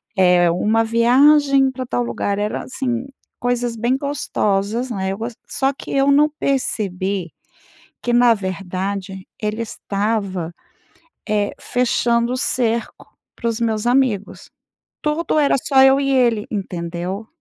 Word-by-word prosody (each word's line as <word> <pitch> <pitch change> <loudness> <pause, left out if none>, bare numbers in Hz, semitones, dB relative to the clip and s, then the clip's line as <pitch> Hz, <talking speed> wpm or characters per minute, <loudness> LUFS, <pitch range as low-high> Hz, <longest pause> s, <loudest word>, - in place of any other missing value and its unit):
é 180 -2 +4
uma 215 +6 +2
viagem 270 +4 +4
pra 255 -1 -6
tal 120 - -1
lugar, 160 +12 -2
era 210 +1 -2
assim, 255 -1 -3 0.3
coisas 245 -1 -1
bem 240 +4 0
gostosas, 240 -4 -1
né, 190 -3 -2
eu 195 - -4
gos 230 +2 -5 0.2
Só 270 +1 0
que, - - -11
eu 275 +1 +3
não 295 +2 +5
percebi 195 - -1 0.7
,que 240 - -1
na 240 -1 +6
verdade 190 0 -4
ele 215 +1 -2
estava, 200 -5 -3 0.7
eh, 210 -1 0
fechando 235 -1 +1
o 255 - -2
cerco 235 -2 -1 0.3
para 235 - -4
os 225 +1 -3
meus 225 0 0
amigos. 245 -6 0 0.5
Tudo 305 +2 0
era 285 -2 +3
só 265 +1 +3
eu 270 +1 +6
e 275 -1 0
ele, 240 -5 +2
entendeu? 180 +1 -4
230 Hz, 135 wpm, -20 LUFS, 195-255 Hz, 0.7 s, na